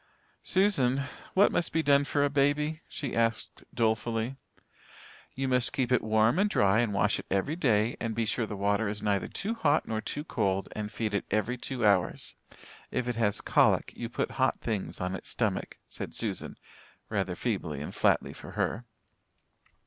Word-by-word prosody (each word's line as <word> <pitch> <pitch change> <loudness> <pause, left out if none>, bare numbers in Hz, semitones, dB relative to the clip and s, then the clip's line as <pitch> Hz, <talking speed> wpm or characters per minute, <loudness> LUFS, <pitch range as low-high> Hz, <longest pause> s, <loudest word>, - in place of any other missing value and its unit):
"Susan, 140 -10 +2 0.3
what 200 +2 +6
must 175 - 0
be 160 0 +1
done 140 -1 +5
for 145 0 +1
a 145 - +3
baby?" 150 +3 +1
she 140 -4 -4
asked 115 -1 -1
dolefully. 115 +2 0 1.0
"You 135 0 -1
must 125 -2 +1
keep 130 -3 0
it 125 - +4
warm 110 +7 +3
and 205 +1 +3
dry 100 - +3
and 120 -3 +1
wash 100 +1 +2
it - - -9
every 100 +11 0
day, 115 -8 +2
and 115 -2 -2
be 115 - 0
sure 110 +1 -1
the 105 - -5
water 100 +2 +1
is 105 0 -5
neither 100 -3 +1
too 215 +4 -3
hot 155 -9 +2
nor 110 -1 -2
too 145 - -4
cold, 95 -10 -1
and 105 -1 -5
feed 110 -2 -2
it 100 - 0
every 110 +4 0
two 125 -1 -3
hours. 100 -4 +2 0.6
If 125 -1 -2
it 120 -2 -2
has 105 -3 +1
colic, - - +3
you 115 - -5
put 120 - -2
hot 130 - +2
things 100 -7 -3
on 90 0 -2
its 95 - -6
stomach," - - -2
said - - -7
Susan, - - -3 0.5
rather 95 -4 -1
feebly 90 - -2
and 75 - -6
flatly - - +2
for - - -10
her. 120 +3 -1
115 Hz, 180 wpm, -29 LUFS, 105-140 Hz, 1.0 s, what